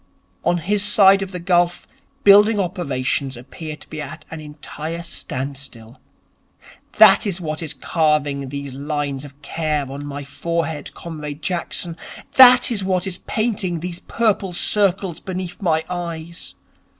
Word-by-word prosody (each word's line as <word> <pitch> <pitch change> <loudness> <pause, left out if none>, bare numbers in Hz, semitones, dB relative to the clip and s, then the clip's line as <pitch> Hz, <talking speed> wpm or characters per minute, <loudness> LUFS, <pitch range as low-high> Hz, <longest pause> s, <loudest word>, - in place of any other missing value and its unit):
On 175 +1 +2
his 200 +5 0
side 195 -1 +5
of 195 -1 -4
the 180 - -4
gulf 175 0 +1 0.4
building 205 +2 +7
operations 140 - -1
appear 155 +5 -8
to - - -14
be 155 - -6
at 140 -1 -8
an 160 - -6
entire 155 +2 -7
standstill. 135 -7 -5 0.9
That - - +7
is 190 -2 -2
what 155 -2 -4
is 155 -3 -4
carving 145 -3 0
these 140 -1 -6
lines 145 0 -3
of 140 -1 -13
care 155 -1 -1
on 140 +1 -6
my 145 0 -6
forehead, 160 +1 -3
Comrade 150 -3 -7
Jackson. 175 -1 -2 0.4
That 250 -1 +8
is 205 -4 0
what 185 -1 0
is 185 -2 -4
painting 200 -6 -1
these 175 +1 -5
purple 205 -5 0
circles 195 -2 +1
beneath 185 -1 -6
my 160 -4 +1
eyes. 170 -2 -6
170 Hz, 140 wpm, -21 LUFS, 145-185 Hz, 0.9 s, That